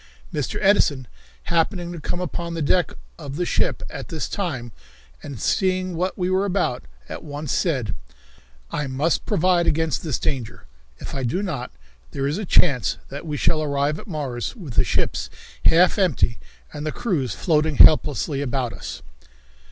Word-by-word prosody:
Mr. 150 Hz, -3 st, -2 dB
Edison, 145 Hz, -, +3 dB, 0.4 s
happening 175 Hz, +1 st, 0 dB
to 175 Hz, -, -6 dB
come 175 Hz, +4 st, -3 dB
upon 170 Hz, -1 st, -3 dB
the 165 Hz, -, -2 dB
deck 175 Hz, +2 st, +2 dB, 0.3 s
of 140 Hz, 0 st, -6 dB
the 175 Hz, +3 st, 0 dB
ship -, -, 0 dB
at -, -, -7 dB
this -, -, -3 dB
time, 140 Hz, -, -3 dB, 0.5 s
and 135 Hz, -5 st, -7 dB
seeing 185 Hz, -, +1 dB
what 180 Hz, +3 st, -1 dB
we 180 Hz, -2 st, 0 dB
were 185 Hz, +1 st, +2 dB
about, 190 Hz, -10 st, 0 dB, 0.3 s
at -, -, -7 dB
once 145 Hz, -1 st, -5 dB
said: 130 Hz, -, 0 dB, 0.8 s
"I 150 Hz, -1 st, -2 dB
must 140 Hz, +5 st, 0 dB
provide 175 Hz, 0 st, +3 dB
against 160 Hz, -1 st, +1 dB
this 155 Hz, -7 st, -1 dB
danger. 135 Hz, -8 st, -3 dB, 0.3 s
If -, -, -8 dB
I 135 Hz, -, -2 dB
do 130 Hz, +11 st, 0 dB
not, 145 Hz, -11 st, -3 dB, 0.4 s
there 135 Hz, -, -1 dB
is 145 Hz, +7 st, 0 dB
a 215 Hz, -, -3 dB
chance 140 Hz, -8 st, +3 dB
that 145 Hz, +4 st, -7 dB
we 150 Hz, -1 st, -2 dB
shall 155 Hz, +3 st, +2 dB
arrive 145 Hz, 0 st, 0 dB
at -, -, -11 dB
Mars 140 Hz, -, -3 dB
with 170 Hz, -, -8 dB
the -, -, +4 dB
ships -, -, -1 dB, 0.4 s
half 180 Hz, +5 st, +5 dB
empty 155 Hz, -, +2 dB, 0.3 s
and 150 Hz, -1 st, -5 dB
the 155 Hz, -, -1 dB
crews 155 Hz, -, -1 dB
floating 155 Hz, -2 st, +2 dB
helplessly 150 Hz, -1 st, +5 dB
around 130 Hz, -3 st, -1 dB
us." -, -, -7 dB
155 Hz, 165 wpm, -23 LUFS, 140-180 Hz, 0.8 s, half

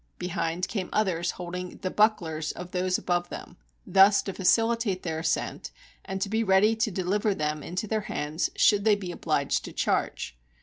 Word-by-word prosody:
Behind 175 Hz, 0 st, -2 dB
came 190 Hz, -4 st, -3 dB
others 180 Hz, -5 st, 0 dB
holding 180 Hz, 0 st, -6 dB
the 185 Hz, -, -1 dB
bucklers 165 Hz, -8 st, +1 dB
of 180 Hz, 0 st, -8 dB
those 185 Hz, 0 st, +1 dB
above 175 Hz, 0 st, -1 dB
them, -, -, -9 dB, 0.3 s
thus 195 Hz, +1 st, +6 dB
to 195 Hz, -, -4 dB
facilitate 225 Hz, 0 st, +2 dB
their 160 Hz, -2 st, -2 dB
ascent, 160 Hz, +1 st, -2 dB, 0.3 s
and 190 Hz, 0 st, -4 dB
to -, -, -2 dB
be 220 Hz, +3 st, 0 dB
ready 205 Hz, +2 st, +4 dB
to 220 Hz, +1 st, 0 dB
deliver 195 Hz, +2 st, 0 dB
them 150 Hz, -1 st, -2 dB
into 180 Hz, +7 st, -4 dB
their 215 Hz, 0 st, -1 dB
hands, 150 Hz, +3 st, -1 dB
should 205 Hz, -2 st, +4 dB
they 215 Hz, -1 st, +5 dB
be 190 Hz, -3 st, -5 dB
obliged -, -, 0 dB
to -, -, -7 dB
charge. -, -, -1 dB
185 Hz, 175 wpm, -27 LUFS, 175-210 Hz, 0.3 s, thus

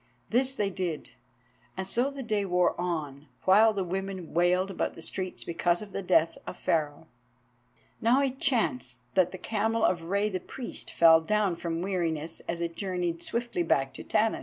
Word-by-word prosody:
This 260 Hz, +3 st, +3 dB
they 205 Hz, -5 st, 0 dB
did, 175 Hz, -5 st, -4 dB, 0.7 s
and 190 Hz, 0 st, -3 dB
so 245 Hz, +6 st, +1 dB
the 275 Hz, -1 st, -7 dB
day 215 Hz, -3 st, 0 dB
wore 180 Hz, -2 st, +2 dB
on, 150 Hz, -5 st, -3 dB, 0.2 s
while 210 Hz, +4 st, +6 dB
the 200 Hz, -3 st, -2 dB
women 190 Hz, -1 st, -4 dB
wailed 180 Hz, +3 st, +2 dB
about -, -, -2 dB
the -, -, -10 dB
streets 185 Hz, +1 st, -4 dB
because 175 Hz, +2 st, 0 dB
of 205 Hz, -, -12 dB
the 195 Hz, -, -3 dB
death 170 Hz, -3 st, +2 dB
of -, -, -6 dB
Pharaoh. 155 Hz, -1 st, -1 dB, 1.0 s
Now 235 Hz, +4 st, +4 dB
it 265 Hz, -1 st, -2 dB
chanced 130 Hz, -, 0 dB, 0.2 s
that 185 Hz, -2 st, +3 dB
the 185 Hz, -, -6 dB
camel 225 Hz, +3 st, -1 dB
of 175 Hz, -2 st, +1 dB
Rei 200 Hz, +4 st, +1 dB
the 190 Hz, -3 st, -2 dB
Priest 245 Hz, +7 st, -5 dB
fell 165 Hz, -1 st, +6 dB
down 205 Hz, 0 st, +1 dB
from 170 Hz, 0 st, -3 dB
weariness 165 Hz, -5 st, -2 dB
as 170 Hz, 0 st, -3 dB
it 170 Hz, -1 st, -3 dB
journeyed 180 Hz, -3 st, -2 dB
swiftly 235 Hz, -4 st, -2 dB
back 135 Hz, -5 st, +1 dB
to -, -, -8 dB
Tanis. 220 Hz, +1 st, +1 dB
185 Hz, 180 wpm, -28 LUFS, 170-210 Hz, 1.0 s, while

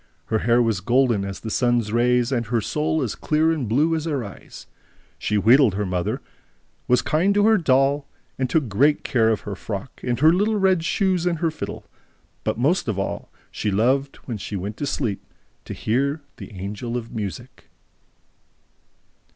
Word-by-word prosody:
Her 110 Hz, -, +3 dB
hair 120 Hz, +2 st, +3 dB
was 110 Hz, -4 st, 0 dB
golden 120 Hz, -1 st, +2 dB
as 100 Hz, -1 st, -5 dB
the 110 Hz, -, -5 dB
sun's 120 Hz, -2 st, +1 dB
rays 120 Hz, +1 st, +2 dB
and 120 Hz, -4 st, -1 dB
her 115 Hz, +1 st, +1 dB
soul 150 Hz, +7 st, -1 dB
as -, -, -2 dB
clear 155 Hz, +1 st, +1 dB
and 145 Hz, -9 st, -2 dB
blue 150 Hz, +8 st, +2 dB
as 160 Hz, 0 st, -3 dB
her 145 Hz, -6 st, -1 dB
eyes. 100 Hz, -, -11 dB, 0.5 s
She 105 Hz, -, 0 dB
wheedled 115 Hz, 0 st, +5 dB
her 105 Hz, +1 st, -1 dB
mother, 90 Hz, -2 st, -2 dB, 0.7 s
was 125 Hz, 0 st, +3 dB
kind 185 Hz, +6 st, +2 dB
to 205 Hz, 0 st, +4 dB
her 220 Hz, -1 st, +5 dB
doll, 140 Hz, -1 st, +2 dB, 0.4 s
took 155 Hz, -6 st, +1 dB
great 140 Hz, +9 st, +2 dB
care 115 Hz, -3 st, +2 dB
of 110 Hz, -, 0 dB
her 105 Hz, -, -6 dB
frock 100 Hz, +5 st, -7 dB
and 120 Hz, -1 st, -1 dB
her 155 Hz, +3 st, +6 dB
little 210 Hz, +4 st, +2 dB
red 190 Hz, -4 st, +2 dB
shoes 185 Hz, 0 st, +1 dB
and 170 Hz, -2 st, 0 dB
her 165 Hz, 0 st, 0 dB
fiddle, 155 Hz, -, -7 dB, 0.6 s
but -, -, -1 dB
most 145 Hz, +9 st, +1 dB
of 110 Hz, -4 st, -1 dB
all 100 Hz, -, -3 dB, 0.3 s
loved, 125 Hz, +7 st, +1 dB
when 115 Hz, -5 st, -5 dB
she 100 Hz, -, -5 dB
went 100 Hz, +3 st, -4 dB
to 145 Hz, -, -3 dB
sleep, 105 Hz, -7 st, -2 dB, 0.4 s
to -, -, -6 dB
hear 140 Hz, +6 st, -1 dB
the -, -, -10 dB
Angel 105 Hz, +5 st, -4 dB
of 115 Hz, -1 st, -7 dB
Music." 100 Hz, -6 st, -7 dB
125 Hz, 175 wpm, -23 LUFS, 110-155 Hz, 0.7 s, her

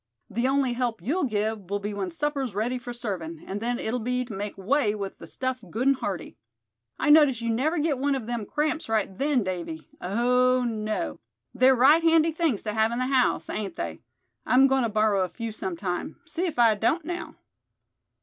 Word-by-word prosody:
The 235 Hz, +3 st, 0 dB
only 270 Hz, -2 st, +2 dB
help 240 Hz, -2 st, -1 dB
you'll 305 Hz, +6 st, 0 dB
give 215 Hz, -4 st, -2 dB
will 200 Hz, -, 0 dB
be 205 Hz, +1 st, -4 dB
when 195 Hz, -2 st, -3 dB
supper's 270 Hz, -, -2 dB
ready 240 Hz, +5 st, -1 dB
for 245 Hz, 0 st, -7 dB
servin', 180 Hz, -9 st, -5 dB
and 200 Hz, +2 st, -5 dB
then 240 Hz, +1 st, -1 dB
it'll 240 Hz, +2 st, -2 dB
be 250 Hz, +2 st, -1 dB
to 235 Hz, -, -8 dB
make 205 Hz, 0 st, -5 dB
way 215 Hz, +2 st, +1 dB
with 200 Hz, -2 st, -6 dB
the -, -, -10 dB
stuff 255 Hz, -2 st, -3 dB
good 230 Hz, +8 st, -2 dB
and 275 Hz, -, +4 dB
hearty. 195 Hz, -9 st, -5 dB, 0.6 s
I 295 Hz, -, +3 dB
notice 295 Hz, -6 st, +6 dB
you 230 Hz, -1 st, -1 dB
never 290 Hz, +9 st, +1 dB
get 295 Hz, -3 st, 0 dB
one 280 Hz, +1 st, +1 dB
of 255 Hz, -5 st, -4 dB
them 235 Hz, -3 st, -3 dB
cramps 305 Hz, -2 st, -1 dB
right 215 Hz, -3 st, 0 dB
then, 275 Hz, 0 st, +1 dB
Davy; 170 Hz, -4 st, -5 dB
oh, 250 Hz, +5 st, +2 dB
no! 215 Hz, -, -3 dB, 0.3 s
They're 260 Hz, +1 st, +5 dB
right 280 Hz, +7 st, +6 dB
handy 330 Hz, 0 st, +4 dB
things 315 Hz, -, 0 dB
to 210 Hz, -, -3 dB
have 220 Hz, +1 st, +2 dB
in 235 Hz, -, -2 dB
the 255 Hz, -, 0 dB
house, 255 Hz, -, +2 dB
ain't 200 Hz, -5 st, -4 dB
they. 85 Hz, -1 st, -4 dB, 0.4 s
I'm 260 Hz, +2 st, +5 dB
goin' 270 Hz, -1 st, +3 dB
to 230 Hz, -, +1 dB
borrow 215 Hz, -2 st, +2 dB
a 185 Hz, -, -3 dB
few 225 Hz, +6 st, -5 dB
sometime, 180 Hz, -3 st, -4 dB
see 340 Hz, +2 st, -2 dB
if 325 Hz, -, -5 dB
I 230 Hz, -2 st, +6 dB
don't 265 Hz, -, 0 dB
now." 350 Hz, +2 st, -5 dB
235 Hz, 205 wpm, -26 LUFS, 205-270 Hz, 0.6 s, notice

